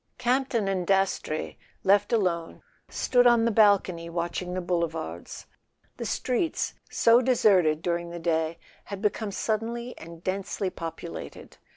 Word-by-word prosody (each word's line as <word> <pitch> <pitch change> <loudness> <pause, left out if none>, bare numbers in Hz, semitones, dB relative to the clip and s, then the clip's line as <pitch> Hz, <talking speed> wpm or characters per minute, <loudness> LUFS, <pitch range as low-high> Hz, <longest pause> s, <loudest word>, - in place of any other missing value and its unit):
A - - -52
SON - - -50
AT - - -48
THE 255 - -17
FRONT 260 +2 +2
Campton 215 -4 +1
and 185 -3 -1
Dastrey, 195 -5 0 0.3
left 205 +2 +3
alone, 180 -7 -1 0.3
stood 245 -1 +3
on 235 -1 +5
the 235 - +2
bal¬ 205 -2 +5
cony 170 -2 -7
watching 175 +1 -3
the - - -1
Boulevards. 165 - -3 0.5
The - - -4
streets, 255 +6 -1 0.2
so 230 +1 +5
deserted 185 -11 +3
during 170 -1 -1
the 170 - -6
day, 165 -1 0 0.3
had 200 -1 -6
become 210 +1 0
suddenly 230 +4 -2
and 165 +1 -11
densely 195 0 -2
populated. 165 - -8
190 Hz, 160 wpm, -27 LUFS, 170-225 Hz, 0.5 s, on